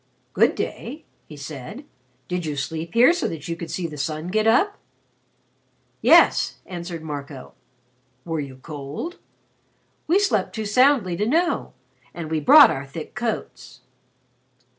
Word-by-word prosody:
"Good - - +3
day," 290 +7 -5 0.2
he 150 - -11
said. 140 - -8 0.4
"Did 180 -1 -3
you 150 -2 -3
sleep 160 +5 -5
here 245 +8 +6
so 350 - -1
that 160 -3 -6
you 165 - -3
could 165 0 -8
see 180 +2 -3
the 150 -3 -6
sun 155 +4 -3
get 215 +3 +1
up?" 390 - +3 1.2
"Yes," - - +5
answered 170 -2 -7
Marco. 145 -3 -7 0.7
"Were 165 -2 -2
you 140 -3 -6
cold?" 150 - -7 0.9
"We 340 +5 +4
slept 405 -1 0
too 220 -1 -3
soundly 245 -4 +3
to 210 - 0
know. 335 +6 0 0.4
And 160 -2 -6
we 160 - +1
brought 290 - +8
our 140 +1 -5
thick 135 - -8
coats." - - -5
170 Hz, 140 wpm, -23 LUFS, 150-240 Hz, 1.2 s, brought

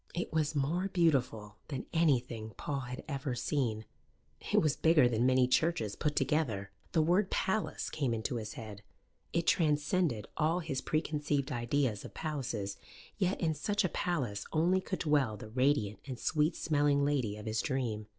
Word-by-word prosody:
It 175 - -3
was 155 -1 +1
more 160 +7 0
beautiful 125 - +1
than 135 -4 -4
anything 125 - +1
Paul 140 -2 -2
had 125 -1 -6
ever 135 -3 -3
seen; 120 -4 -1 0.7
it - - +3
was 155 -3 +2
bigger 160 -5 +5
than 120 +1 +2
many 130 -1 +4
churches 125 -6 +1
put 150 -1 -1
together; 110 -11 0 0.2
the 160 -3 +4
word 180 +5 +3
"Palace" 210 +3 -1
came 140 -5 -1
into 115 +3 -2
his 105 -2 -5
head 105 -4 -8 0.5
it 170 0 0
transcended 150 - +2
all 160 +3 +2
his 150 -5 -3
preconceived 150 -3 -1
ideas 120 -2 0
of - - -10
palaces: 115 -10 -3 0.4
yet 190 -1 +1
in 160 -3 +1
such 205 +7 0
a - - +1
palace 130 - -2
only 175 +4 +3
could 185 - -3
dwell 145 -9 +1
the 110 - -9
radiant 125 -4 +1
and 130 -3 -5
sweet 155 +6 +1
smelling 145 -2 +2
lady 130 -8 0
of 105 - -9
his 110 0 0
dream. 115 -6 -2
140 Hz, 165 wpm, -32 LUFS, 115-160 Hz, 0.7 s, bigger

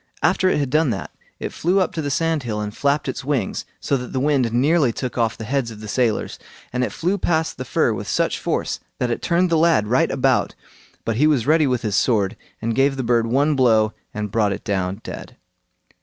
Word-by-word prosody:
After 185 +2 +3
it - - +1
had 140 -3 -1
done 155 0 +3
that, 105 -5 -4 0.3
it - - -5
flew 180 +4 +1
up 185 - 0
to 160 - -2
the 145 - -2
sandhill 140 -7 -1
and 105 0 -4
flapped 140 +1 +1
its 130 - -4
wings, 135 -7 -1
so 140 - 0
that 125 -1 -7
the 130 - 0
wind 135 -4 +2
nearly 140 +2 +3
took 125 +2 -5
off 115 -4 0
the - - -6
heads 130 +1 -1
of 110 -2 -10
the 110 - -8
sailors, 115 0 0 0.3
and 125 0 0
it - - -1
flew 185 +4 -1
past 160 -5 0
the 130 - -4
fir 125 -3 +1
with 100 0 -5
such - - 0
force - - -2 0.2
that 125 -1 -1
it - - -2
turned 175 +1 +1
the 165 - +3
lad 165 -10 +4
right 120 +5 +2
about, - - +1 0.5
but 115 -1 -1
he 150 +4 +4
was 140 -7 +2
ready 155 0 +4
with 125 -2 0
his 105 -3 -1
sword, 105 -2 +2 0.3
and 115 +1 0
gave 135 +2 +2
the 130 - -2
bird 115 -1 +2
one 140 +5 +2
blow 110 -5 +3 0.2
and 105 -1 -4
brought 105 -2 +2
it 100 - -7
down 95 +1 -2
dead. - - -8
130 Hz, 230 wpm, -21 LUFS, 110-150 Hz, 0.5 s, lad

